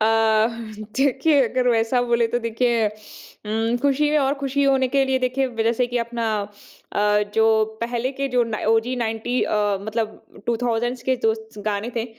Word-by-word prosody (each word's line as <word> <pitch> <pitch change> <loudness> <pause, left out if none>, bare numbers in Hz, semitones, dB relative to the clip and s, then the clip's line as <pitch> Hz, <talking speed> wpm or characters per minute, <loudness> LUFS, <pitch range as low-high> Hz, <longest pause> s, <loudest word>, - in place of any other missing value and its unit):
अ, 220 0 +3 0.5
देखिए 280 +2 +3
अगर 250 +1 0
वैसा 230 +1 +2
बोले 235 -1 +2
तो 240 +1 0
देखिए 230 -1 +1 0.6
उम, 225 +2 0
खुश 280 -1 +2
ही 300 - +4
हैं 300 +1 +3
और 275 -1 +1
खुशी 280 0 -1
होने 265 -1 +3
के 275 +1 +2
लिए 265 0 +1
देखिए 255 +1 0
जैसे 235 +2 +1
कि 245 0 -2
अपना 235 -1 -2 0.6
अ, - - 0 0.3
जो 220 -1 +4 0.2
पहले 240 +2 -2
के 275 0 -2
जो 250 -2 +2
ना 225 -2 -4
ओजी 225 +3 +2
90 230 +1 -1
अ, 205 -2 0
मतलब 220 0 -5
2000 240 +1 -1
के 260 0 +1
जो 220 - +3 0.3
गाने 210 +2 -2
थे 230 - 0
240 Hz, 170 wpm, -22 LUFS, 225-260 Hz, 0.6 s, ही